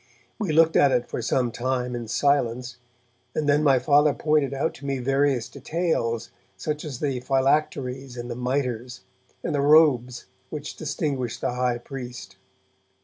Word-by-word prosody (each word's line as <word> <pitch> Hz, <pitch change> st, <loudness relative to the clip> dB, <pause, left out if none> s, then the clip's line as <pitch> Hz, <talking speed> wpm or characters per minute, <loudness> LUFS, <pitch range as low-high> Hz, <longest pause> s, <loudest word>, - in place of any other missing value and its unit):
We 200 Hz, -7 st, -1 dB
looked 165 Hz, +1 st, +4 dB
at 140 Hz, -, +5 dB
it 125 Hz, -1 st, +1 dB
for -, -, -4 dB
some 120 Hz, +1 st, 0 dB
time 125 Hz, +1 st, -2 dB
in 120 Hz, -1 st, -5 dB
silence, 125 Hz, -1 st, 0 dB, 0.6 s
and 150 Hz, -, -1 dB
then 145 Hz, +1 st, +4 dB
my 135 Hz, -3 st, +5 dB
Father 145 Hz, +2 st, +4 dB
pointed 150 Hz, -3 st, +1 dB
out 140 Hz, +4 st, -1 dB
to 140 Hz, -, -12 dB
me 135 Hz, -1 st, -1 dB
various 135 Hz, -1 st, +1 dB
details, 140 Hz, -, -2 dB, 0.3 s
such 150 Hz, -1 st, -3 dB
as 140 Hz, -5 st, -6 dB
the 135 Hz, -4 st, -1 dB
phylacteries 135 Hz, -1 st, 0 dB
and 120 Hz, 0 st, -5 dB
the 120 Hz, -, -5 dB
mitres, 125 Hz, -1 st, -2 dB, 0.4 s
and -, -, -2 dB
the 145 Hz, -, +1 dB
robes 140 Hz, -5 st, +4 dB, 0.2 s
which 150 Hz, -1 st, -6 dB
distinguished 140 Hz, -6 st, -3 dB
the -, -, -1 dB
high 125 Hz, -1 st, 0 dB
priest. 125 Hz, 0 st, -8 dB
135 Hz, 155 wpm, -25 LUFS, 125-145 Hz, 0.6 s, at